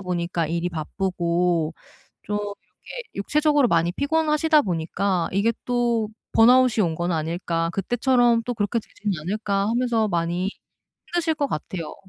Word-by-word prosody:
보니까 175 -3 -2
일이 170 +1 -1
바쁘고 170 0 -1 0.5
좀 205 - -4
이렇게 205 - -8
육체적으로 295 +5 +2
많이 170 -2 +2
피곤하시다 305 - +2
보니까 180 - -1
이게 200 +5 +2
'또 235 -3 +1 0.2
번아웃이 240 -1 +5
온 165 - -1
건 175 +2 -2
아닐까? 165 +1 -1
그때처럼 240 +2 +2
또 245 - -2
그렇게 220 +1 -1
되진 210 -1 -5
않을까?' 200 +3 -1
하면서 235 -2 +1
많이 175 +1 -1 0.6
힘드실 340 -2 0
것 285 -2 0
같아요. 165 - -5
200 Hz, 320 characters per minute, -23 LUFS, 170-245 Hz, 0.6 s, 번아웃이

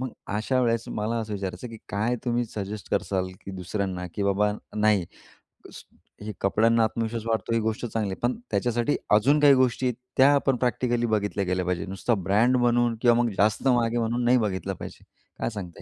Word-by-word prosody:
मग 130 -1 -3 0.3
अशा 130 +4 0
वेळेस 115 -1 +1
मला 110 +3 -1
असं 110 -1 -5
विचारायचं 95 +2 -5
की 115 -1 -10
काय 110 +5 0
तुम्ही 120 0 0
सजेस्ट 105 0 -6
कराल 95 -2 -1 0.2
की - - -6
दुसऱ्यांना 95 0 -3
की 100 - -2
बाबा 100 +1 +2 0.2
नाही 105 -3 +3 0.7
स - - -10 0.4
हे 105 - -4
कपड्यांना 115 +3 +3
आत्मविश्वास 115 0 -2
वाढतो 115 +1 -1
ही 115 - +2
गोष्ट 110 +2 -2
चांगली 110 -3 -2
आहे, 95 - -6
पण 120 - 0
त्याच्यासाठी 120 +3 0 0.2
अजून 135 +8 +4
काही 145 -1 +7
गोष्टी, 130 -1 +2 0.3
त्या 135 +2 +6
आपण 135 -2 +2
प्रॅक्टिकली 120 -1 0
बघितल्या 105 -3 0
गेल्या 90 0 -1
पाहिजे. 90 +1 -1
नुसता 95 +5 -1
ब्रँड 115 +6 +3
म्हणून 120 -1 +2
किंवा 120 -1 +5
मग 120 - +1
जास्त 105 +6 +2
महाग 120 -2 +4
आहे 120 - -2
म्हणून 120 +2 -1
नाही 125 +1 +5
बघितलं 95 -3 -2
पाहिजे. - - -9 0.4
काय - - -1
सांगता 95 -5 -8
115 Hz, 190 wpm, -26 LUFS, 100-120 Hz, 0.7 s, काही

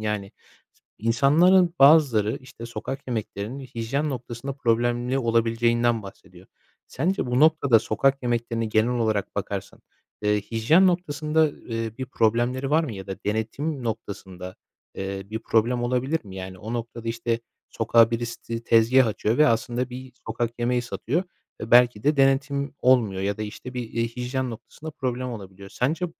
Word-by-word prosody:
Yani, 105 -2 -3 0.7
insanların 165 - +4
bazıları, 135 -7 +5
işte, 120 -3 -10
sokak 135 +3 -6
yemeklerinin 110 +1 -4
hijyen 130 +3 -3
noktasında 125 +1 -5
problemli 120 0 0
olabileceğinden 115 -1 +1
bahsediyor. 100 - -13 0.4
Sence 185 -1 -1
bu 125 +1 +1
noktada 150 -6 +5
sokak 135 +6 +1
yemeklerine 115 -1 -1
genel 110 +2 +2
olarak 110 -3 -1
bakarsan, - - -4 0.4
eee, 105 0 +2
hijyen 120 - +3
noktasında, 155 -3 +1
eee, 115 -4 -5
bir 130 - -4
problemleri 120 +3 0
var 160 +2 +3
mı 135 - -5
ya 95 -2 -8
da 95 - -5
denetim 125 +7 -2
noktasında, 95 -4 -6 0.4
eee, 95 0 -4
bir 110 - -3
problem 120 +2 +1
olabilir 130 +5 -1
mi? 95 -2 -10
Yani, 95 0 -7
o 110 +5 -6
noktada, 115 -1 -5
işte, 115 0 -1 0.3
sokağa 115 0 +4
birisi 120 0 -4
ti 115 0 -5
tezgâh 115 +3 +5
açıyor 110 +2 -1
ve 150 - +6
aslında 120 +2 -1
bir 130 +1 -9
sokak 115 +1 -1
yemeği 120 +1 +1
satıyor 135 +6 -2 0.4
ve 110 - -6
belki 120 -3 +5
de 150 +1 +3
denetim 135 +1 +1
olmuyor 115 -7 +3
ya 100 +1 -1
da, - - -2
işte, 115 +4 -8
bir, 120 -2 -4
eee, 115 0 0
hijyen 125 +2 -3
noktasında 150 +7 -9
problem 130 -3 -3
olabiliyor. 100 -3 -9
Sence 155 +10 -1
120 Hz, 150 wpm, -25 LUFS, 110-135 Hz, 0.7 s, ve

